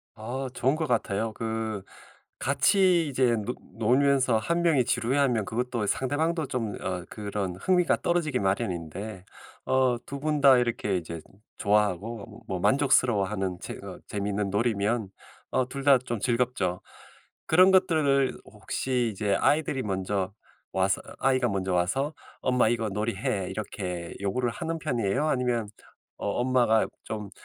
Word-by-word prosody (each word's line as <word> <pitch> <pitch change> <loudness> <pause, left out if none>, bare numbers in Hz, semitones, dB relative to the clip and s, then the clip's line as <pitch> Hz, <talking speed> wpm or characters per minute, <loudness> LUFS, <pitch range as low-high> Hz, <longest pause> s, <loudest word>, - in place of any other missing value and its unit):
아. 125 +5 -4
좋은 130 +3 +2
것 160 -1 -1
같아요. 110 -3 0
그 110 -2 -3 0.6
같이 185 -5 +3
이제 130 -3 +2
노 125 - -3 0.2
놀면서 130 +1 +3
1 170 +9 0
명이 155 -7 +3
지루해하면 125 -1 +1
그것도 120 0 -2
상대방도 155 - 0
좀 115 -6 -3
어 90 -2 -3
그런 100 -4 -4
흥미가 180 - +2
떨어지기 165 -6 +1
마련인데 95 -1 -3 0.4
어 130 -2 +2
2 140 0 -6
분 150 0 0
다 135 -2 +8
이렇게 120 -5 0
이제 85 -1 -5 0.4
좋아하고 105 +1 +1
어 110 +1 -12
뭐 95 -2 -2
만족스러워하는 105 -8 +2
재 - - -6
어 - - -8
재미있는 100 0 -2
놀이면 105 0 0 0.4
어 130 -1 +2
둘 140 +1 -5
다 140 -2 +7
좀 120 -3 -4
즐겁죠. 120 -7 0 0.7
그런 185 +4 +6
것들을 145 -7 +3
혹시 125 -2 -2
이제 100 0 0
아이들이 145 -3 +1
먼저 95 -1 -2 0.4
와서 95 +1 +1 0.2
아이가 130 -2 +2
먼저 95 -2 -1
와서 135 - 0 0.3
"엄마 125 -3 +3
이거 115 -1 0
놀이 105 +2 -2
해." 95 -1 -1
이렇게 95 -4 -5
요구를 120 +5 0
하는 165 +6 -4
편이에요? 125 -2 0
아니면 125 -5 0 0.5
어 - - -3
엄마가 120 -3 +3 0.2
좀 105 -2 -5
120 Hz, 290 characters per minute, -27 LUFS, 100-135 Hz, 0.7 s, 다